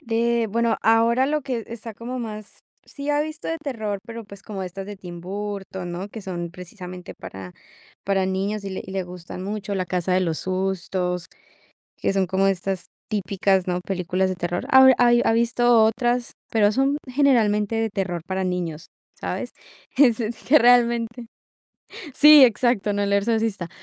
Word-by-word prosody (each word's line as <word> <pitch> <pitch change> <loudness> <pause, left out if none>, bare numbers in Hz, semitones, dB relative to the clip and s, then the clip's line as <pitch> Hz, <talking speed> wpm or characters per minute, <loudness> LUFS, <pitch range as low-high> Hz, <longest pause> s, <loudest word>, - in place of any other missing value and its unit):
De 235 -3 +1
bueno, 230 +2 +1
ahora 230 +3 +4
lo 300 0 0
que 250 -5 -3
está 230 -1 -8
como 245 +4 -6
más 215 -3 -7 0.2
sí 285 0 -5
ha 290 0 +2
visto 310 0 -5
de 325 - -2
terror, 225 -9 -4
pero, 230 0 -7
pues, 200 -1 -13
como 195 -1 -6
estas 190 +1 -6
de 205 0 -7
Tim 175 -2 -9
Burton, 190 -1 -5
¿no?, 185 +3 -5
que 220 +1 -9
son 175 -3 -5
precisamente 180 0 -9
para 95 -1 -9 0.5
para 195 -1 +1
niños, 200 +2 -2
y 195 - -4
le 190 - -5
y 190 - -9
le 190 - -1
gustan 180 0 -9
mucho. 205 0 -4
La 185 -2 -2
casa 180 0 -1
de 185 - +3
los 165 -3 -1
sustos, 185 -1 -2 0.7
que - - -1
son 195 -1 +1
como 190 +2 +1
estas 190 -1 -1 0.2
típicas, 195 -1 0
¿no?, 180 0 0
películas 185 0 -1
de 185 - -3
terror. 175 0 -3
Ahora 265 0 +8
hay 240 -1 +5
ha - - +3
visto 235 0 +3
otras, 240 +2 0 0.2
pero 210 -2 +3
son 270 +5 +1
generalmente 225 -6 +2
de 225 0 0
terror 185 -4 -2
para 190 0 -2
niños, 175 -3 -3 0.3
¿sabes? - - -5 0.4
Es 250 -5 +5 0.3
que 300 +3 +7
realmente 235 -1 +3 0.9
sí, 300 -2 +9
exacto, 235 -3 +2
no 205 0 0
El 200 0 0
exorcista. 215 -3 0
205 Hz, 170 wpm, -23 LUFS, 185-235 Hz, 0.9 s, sí